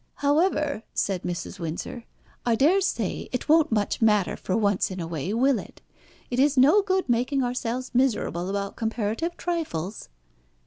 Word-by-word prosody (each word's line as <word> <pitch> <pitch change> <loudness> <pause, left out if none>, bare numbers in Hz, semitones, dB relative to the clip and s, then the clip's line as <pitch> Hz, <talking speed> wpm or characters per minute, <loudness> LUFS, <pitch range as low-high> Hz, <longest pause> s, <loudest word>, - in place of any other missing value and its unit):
"However," 295 - +1
said 190 -3 0
Mrs. 175 +2 -5
Windsor, 170 +8 -5 0.4
"I 235 -2 +2
daresay 370 - +1
it 250 - -3
won't 315 -1 +4
much 210 0 0
matter 210 -4 +3
for 185 - -2
once 205 -3 +1
in 185 -1 -6
a 170 - -3
way, 165 +2 -4
will 255 +3 +2
it? - - -11 0.5
It 245 - 0
is 285 +1 +3
no 295 +11 +6
good 380 -1 0
making 250 +3 +1
ourselves 250 0 -3
miserable 220 -8 +1
about 200 0 -3
comparative 225 +8 -2
trifles." 225 - -3
240 Hz, 150 wpm, -25 LUFS, 200-290 Hz, 0.5 s, no